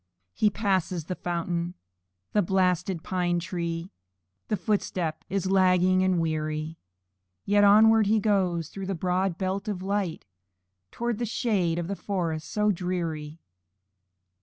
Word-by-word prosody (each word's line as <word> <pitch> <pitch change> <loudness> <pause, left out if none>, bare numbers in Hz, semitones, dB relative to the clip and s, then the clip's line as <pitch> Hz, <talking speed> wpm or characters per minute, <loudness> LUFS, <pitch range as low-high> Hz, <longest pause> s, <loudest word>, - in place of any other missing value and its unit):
He 215 - +3
passes 190 -5 -1
the 185 - -3
fountain, 175 0 -2 0.6
the 210 - +4
blasted 180 -1 +1
pine 180 -2 0
tree, 170 0 -3 0.6
And 210 - +1
his 175 - -26
footstep 180 -6 -1
is 190 0 -1
lagging 185 -1 +4
and 185 -2 +2
weary; 155 0 -2 0.7
Yet 205 0 +4
onward 215 +1 +6
he 220 +1 +3
goes, 185 -6 +1
through 195 -1 -6
the 195 - -1
broad 180 +1 0
belt 190 +3 -2
of 190 -3 -3
light, 195 -4 -2 0.6
Towards 235 - -3
the 240 - -1
shades 195 -7 0
of 170 - -3
the 200 - -2
forest 170 -6 -3
so 210 0 +2
dreary. 165 -4 -3
185 Hz, 135 wpm, -27 LUFS, 170-200 Hz, 0.7 s, onward